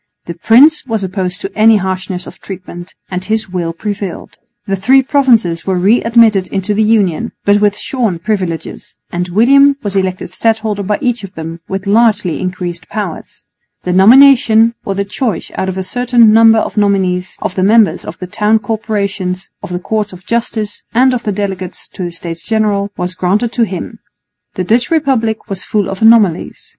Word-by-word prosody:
The 170 - -6
prince 255 - +4
was 220 -4 -2
opposed 185 -1 -3
to 195 - -7
any 220 0 +5
harshness 185 -1 -4
of - - -12
treatment, 180 -2 -9 0.2
and 180 0 -3
his 215 0 -2
will 175 -2 -3
prevailed. 200 +1 -6 0.3
The 195 - -1
three 255 +8 +3
provinces 235 - +1
were 190 -1 0
re 200 +7 +3
admitted 225 -5 +3
into 195 +2 -2
the 210 - 0
Union, 215 -1 +1
but 205 0 +3
with 205 -1 +2
shorn 230 -9 -2
privileges; 180 -3 -4 0.2
and 175 +1 -2
William 275 +8 +4
was 200 -1 -3
elected 185 -2 -2
stadholder 220 0 -1
by 205 +2 -1
each 245 -4 -1
of 195 0 -10
them 165 +1 -7
with 195 0 -4
largely 210 -4 +2
increased 180 -2 -5
powers. 205 -6 -6 0.4
The 180 - -1
nomination, 230 +2 +6
or 195 - -2
the 200 +1 -2
choice 215 +3 -3
out 190 - -3
of 190 - -5
a 190 - -2
certain 240 +2 +3
number 225 0 +6
of 220 - -2
nominees, 190 -3 0
of - - -3
the 185 - -2
members 215 +2 +3
of - - -8
the 185 - -6
Town 210 +3 +1
Corporations, 200 -4 -3
of - - -8
the 180 - -3
Courts 210 +3 -3
of 185 0 -13
Justice 225 -2 -3
and 255 +2 +4
of 245 - -2
the 210 - 0
delegates 190 -2 -5
to 185 - -6
the 175 - -5
States 170 0 -6
General, 210 -3 0
was 180 +1 -3
granted 200 +6 0
to 240 -1 +1
him. 185 -5 -7 0.6
The 185 - -2
Dutch 230 +6 +1
Republic 260 -10 0
was 195 -3 -5
full 205 -1 -1
of 195 +1 -6
anomalies. 220 -6 +3
205 Hz, 185 wpm, -13 LUFS, 185-225 Hz, 0.6 s, nomination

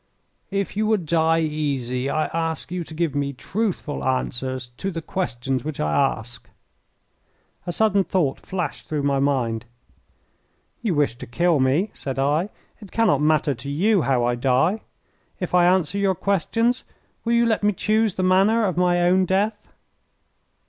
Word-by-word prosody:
"If 200 0 -2
you 215 +1 +1
would 215 -6 +1
die 165 +1 +2
easy 140 -5 -2
I 155 +1 +1
ask 165 0 -2
you 180 -1 -2
to - - -10
give 165 -3 0
me 140 -1 -1
truthful 185 - -3
answers 130 -1 -2
to 195 - -3
the 165 -3 -4
questions 130 -7 -2
which 155 -1 -5
I 75 0 0
ask." 120 -3 -1 1.2
A - - 0
sudden 200 +1 +2
thought 170 -8 0
flashed 175 -6 -4
through 150 -2 -1
my 140 -1 +1
mind. 125 -5 0 1.2
"You 215 -8 0
wish 145 -5 +1
to - - -8
kill 170 +4 +2
me," 140 +11 +2
said 135 -1 -5
I; 150 +8 +1 0.3
"it 205 -4 -13
cannot 215 -12 +2
matter 150 -1 +2
to 130 +3 -8
you 190 +7 +2
how 130 -4 +1
I 120 - +1
die. 135 - +1 0.6
If 180 -3 -4
I 175 -1 +5
answer 185 +1 +2
your 195 -1 +2
questions, 225 +7 0 0.4
will 235 - 0
you 235 0 +4
let 225 -2 +1
me 210 0 +3
choose 215 +1 +1
the 185 - -1
manner 195 +5 +4
of 185 -4 -1
my 175 -1 +3
own 185 +2 +4
death?" 205 +3 0
165 Hz, 165 wpm, -23 LUFS, 135-195 Hz, 1.2 s, I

